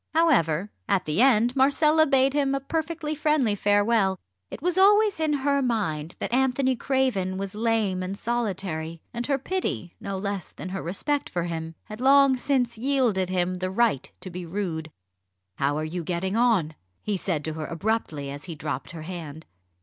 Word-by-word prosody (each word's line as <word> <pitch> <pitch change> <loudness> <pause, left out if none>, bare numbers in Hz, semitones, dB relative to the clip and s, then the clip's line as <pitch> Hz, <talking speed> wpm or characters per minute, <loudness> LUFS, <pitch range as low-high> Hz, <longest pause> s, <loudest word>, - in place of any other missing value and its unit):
However, 210 - +3 0.2
at 195 -2 +2
the 155 +8 +1
end, 245 -1 +4
Marcella 305 +4 +4
bade 270 -1 +3
him 275 -2 +1
a - - 0
perfectly 315 +2 -3
friendly 300 -7 +2
farewell. 205 -1 +2 0.3
It - - -7
was 350 +3 0
always 410 0 +5
in 315 -1 +1
her 280 0 +1
mind 180 - -1
that - - -4
Anthony 260 0 +2
Craven 240 -8 0
was 195 0 -4
lame 215 -4 0
and 185 +2 -4
solitary, 190 -9 -3
and 240 0 -3
her 280 -1 +2
pity 265 - -3
no 195 -1 -4
less 200 -1 -4
than 185 - -7
her 190 +1 -4
respect 285 - -2
for 175 - -2
him 165 -1 -4
had 215 +2 -9
long 275 0 +6
since 245 -3 0
yielded 240 -8 +1
him 185 0 0
the 185 0 -2
right 205 - +1
to 185 - -8
be 180 +1 -6
rude. 165 -3 -3 0.7
"How 140 +1 +1
are 155 - -2
you 170 +2 -4
getting 185 +4 -2
on?" 225 -10 +2 0.3
he 210 - -1
said 175 -5 -2
to 160 - -2
her 155 -1 -5
abruptly 165 -6 -2
as 145 +1 -8
he 170 -3 -6
dropped 150 +2 -5
her 160 -2 -7
hand. 160 -3 -7
205 Hz, 180 wpm, -26 LUFS, 175-270 Hz, 0.7 s, long